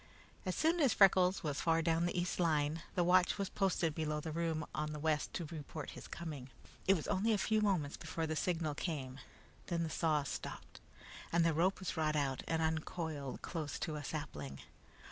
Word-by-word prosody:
As 185 Hz, -, 0 dB
soon 330 Hz, +2 st, +3 dB
as 275 Hz, -6 st, +4 dB
Freckles 185 Hz, -1 st, +5 dB
was 145 Hz, -3 st, -1 dB
far 165 Hz, 0 st, +3 dB
down 165 Hz, +1 st, +2 dB
the 175 Hz, -, -1 dB
east 180 Hz, +1 st, -1 dB
line, 155 Hz, -2 st, +2 dB
the 175 Hz, -, +3 dB
watch 180 Hz, +2 st, +4 dB
was 200 Hz, -2 st, -1 dB
posted 185 Hz, -5 st, +1 dB
below 155 Hz, -1 st, -1 dB
the 160 Hz, +1 st, -4 dB
room 160 Hz, -1 st, -1 dB
on 150 Hz, 0 st, -2 dB
the 150 Hz, -, -5 dB
west 155 Hz, 0 st, 0 dB
to 170 Hz, -, -2 dB
report 155 Hz, -1 st, -6 dB
his -, -, -9 dB
coming. 150 Hz, -6 st, -6 dB, 0.4 s
It 195 Hz, -, +7 dB
was 160 Hz, -, -3 dB
only 220 Hz, +4 st, +2 dB
a -, -, +3 dB
few 215 Hz, +2 st, +2 dB
moments 180 Hz, -9 st, +1 dB
before 165 Hz, 0 st, -3 dB
the 160 Hz, 0 st, -2 dB
signal 165 Hz, -2 st, 0 dB
came. 135 Hz, -5 st, -4 dB, 0.5 s
Then 170 Hz, -1 st, 0 dB
the 160 Hz, -, -3 dB
saw 155 Hz, -3 st, +2 dB
stopped, 140 Hz, -, -6 dB, 0.5 s
and 170 Hz, 0 st, +4 dB
the 165 Hz, -, +3 dB
rope 180 Hz, +5 st, +2 dB
was 190 Hz, -, -2 dB
brought 155 Hz, -2 st, 0 dB
out 135 Hz, -3 st, 0 dB
and 160 Hz, 0 st, +1 dB
uncoiled 160 Hz, -3 st, -2 dB
close 155 Hz, -4 st, -3 dB
to 155 Hz, -, -3 dB
a 150 Hz, -, -5 dB
sapling. 75 Hz, -, -5 dB
160 Hz, 200 wpm, -36 LUFS, 150-180 Hz, 0.5 s, It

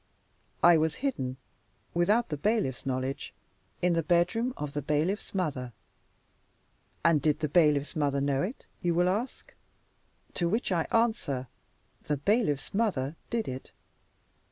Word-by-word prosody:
I 170 Hz, -1 st, +8 dB
was 155 Hz, 0 st, +1 dB
hidden 130 Hz, -, -1 dB, 0.6 s
(without 205 Hz, +8 st, +2 dB
the 150 Hz, -, -1 dB
bailiff's 200 Hz, -, 0 dB
knowledge) 130 Hz, +1 st, -3 dB, 0.5 s
in 180 Hz, -1 st, +4 dB
the 165 Hz, -, +2 dB
bedroom 180 Hz, +9 st, +2 dB
of 145 Hz, -1 st, -4 dB
the 145 Hz, -, -2 dB
bailiff's 155 Hz, +10 st, -1 dB
mother. 135 Hz, -10 st, -2 dB, 1.3 s
And 165 Hz, -3 st, +5 dB
did 150 Hz, +1 st, +1 dB
the 155 Hz, -, +1 dB
bailiff's 150 Hz, -1 st, +3 dB
mother 145 Hz, -3 st, +1 dB
know 140 Hz, -1 st, +1 dB
it? 215 Hz, -, -4 dB, 0.2 s
you 175 Hz, -2 st, +1 dB
will 175 Hz, +1 st, +3 dB
ask. 220 Hz, +8 st, -3 dB, 0.8 s
To 170 Hz, -2 st, 0 dB
which 220 Hz, +2 st, 0 dB
I 170 Hz, -3 st, +1 dB
answer: 220 Hz, -, +1 dB, 0.6 s
the 150 Hz, -, 0 dB
bailiff's 200 Hz, -, +1 dB
mother 175 Hz, -10 st, 0 dB
did 230 Hz, -2 st, -1 dB
it. 130 Hz, 0 st, -6 dB
165 Hz, 135 wpm, -29 LUFS, 140-200 Hz, 1.3 s, I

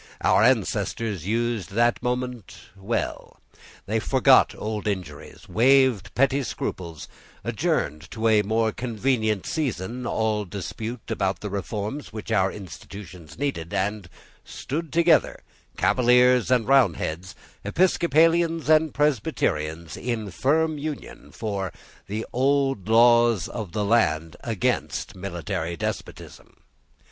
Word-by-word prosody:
Our -, -, +4 dB
ancestors 105 Hz, -, 0 dB
used 115 Hz, -4 st, -1 dB
that 120 Hz, +2 st, +2 dB
moment 125 Hz, -3 st, -3 dB, 0.2 s
well. 100 Hz, +4 st, -4 dB, 0.5 s
They -, -, 0 dB
forgot -, -, +4 dB
old 105 Hz, 0 st, -4 dB
injuries, 95 Hz, -3 st, -5 dB
waved 120 Hz, 0 st, +3 dB
petty 140 Hz, +1 st, +3 dB
scruples, 85 Hz, -, -5 dB, 0.4 s
adjourned 75 Hz, +4 st, -1 dB
to 115 Hz, 0 st, -1 dB
a 110 Hz, -1 st, +5 dB
more 110 Hz, +2 st, +1 dB
convenient 110 Hz, -3 st, -1 dB
season 120 Hz, -, -3 dB
all 110 Hz, -1 st, 0 dB
dispute 110 Hz, +6 st, -6 dB
about 95 Hz, -3 st, -1 dB
the 105 Hz, -, -5 dB
reforms 105 Hz, -, -4 dB
which 110 Hz, +1 st, -7 dB
our 95 Hz, -3 st, +2 dB
institutions 95 Hz, -3 st, -10 dB
needed, 130 Hz, -, -3 dB
and 100 Hz, -1 st, -2 dB, 0.3 s
stood 160 Hz, +3 st, -5 dB
together, 170 Hz, -1 st, +3 dB, 0.3 s
Cavaliers 125 Hz, -1 st, +4 dB
and 125 Hz, -3 st, +2 dB
Roundheads, 95 Hz, -9 st, +1 dB, 0.3 s
Episcopalians 165 Hz, -, +2 dB
and 155 Hz, -1 st, +3 dB
Presbyterians, 85 Hz, -, -1 dB
in 110 Hz, -4 st, -3 dB
firm 155 Hz, -, +1 dB
union, 150 Hz, -1 st, -7 dB
for 100 Hz, -5 st, -3 dB, 0.4 s
the 110 Hz, +3 st, -3 dB
old 135 Hz, -5 st, +1 dB
laws 115 Hz, -4 st, +5 dB
of 110 Hz, -7 st, -6 dB
the 105 Hz, -1 st, -1 dB
land 80 Hz, -8 st, +1 dB
against 110 Hz, -6 st, -2 dB
military 85 Hz, -2 st, -4 dB
despotism. -, -, -6 dB
110 Hz, 110 wpm, -24 LUFS, 95-125 Hz, 0.5 s, a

